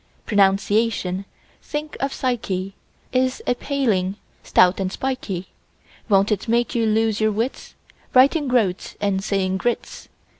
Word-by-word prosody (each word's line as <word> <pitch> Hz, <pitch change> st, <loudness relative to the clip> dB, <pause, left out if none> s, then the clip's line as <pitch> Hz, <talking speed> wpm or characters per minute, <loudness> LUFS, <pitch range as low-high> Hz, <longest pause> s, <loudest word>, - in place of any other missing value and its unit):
Pronunciation—think 205 Hz, +7 st, 0 dB
of 275 Hz, 0 st, -1 dB
psyche!— 195 Hz, -8 st, -2 dB, 0.4 s
Is 255 Hz, 0 st, +1 dB
a -, -, +2 dB
paling, 225 Hz, -9 st, 0 dB, 0.3 s
stout 180 Hz, +1 st, +4 dB
and 190 Hz, -1 st, -1 dB
spikey; 200 Hz, -8 st, -3 dB, 0.6 s
Won't 200 Hz, +1 st, +4 dB
it 210 Hz, +2 st, -1 dB
make 235 Hz, +1 st, +1 dB
you 230 Hz, -2 st, +1 dB
lose 220 Hz, 0 st, +1 dB
your 215 Hz, 0 st, +3 dB
wits, 225 Hz, +5 st, -3 dB, 0.4 s
Writing 280 Hz, +4 st, +5 dB
"groats" 220 Hz, -8 st, 0 dB
and 195 Hz, -1 st, 0 dB
saying 190 Hz, -2 st, 0 dB
groats? 240 Hz, +4 st, -3 dB
215 Hz, 120 wpm, -22 LUFS, 195-250 Hz, 0.6 s, Writing